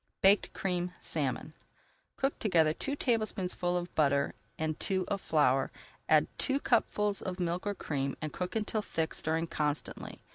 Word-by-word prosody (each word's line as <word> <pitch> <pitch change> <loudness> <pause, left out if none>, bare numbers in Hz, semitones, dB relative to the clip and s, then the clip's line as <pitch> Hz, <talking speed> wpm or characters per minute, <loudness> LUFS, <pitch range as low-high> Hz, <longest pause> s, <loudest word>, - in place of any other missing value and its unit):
BAKED 195 +2 +5
CREAMED 180 -1 -1
SALMON 145 0 -2 0.6
Cook 270 +1 0
together 165 -7 +4
two 280 - -3
tablespoonfuls 195 -8 0
of 175 - -12
butter 140 -2 +2 0.2
and 155 -1 -2
two 190 -1 0
of 200 -1 -1
flour, 135 -4 +3 0.4
add - - +6
two 275 0 +3
cupfuls 210 -6 +1
of 185 0 -4
milk 175 +2 -1
or 205 - 0
cream, 140 -5 -2
and 155 -2 -4
cook 180 +2 -3
until 215 0 0
thick, 160 -5 -2
stirring 160 +1 0
constantly. 150 -2 -3
175 Hz, 150 wpm, -31 LUFS, 155-200 Hz, 0.6 s, add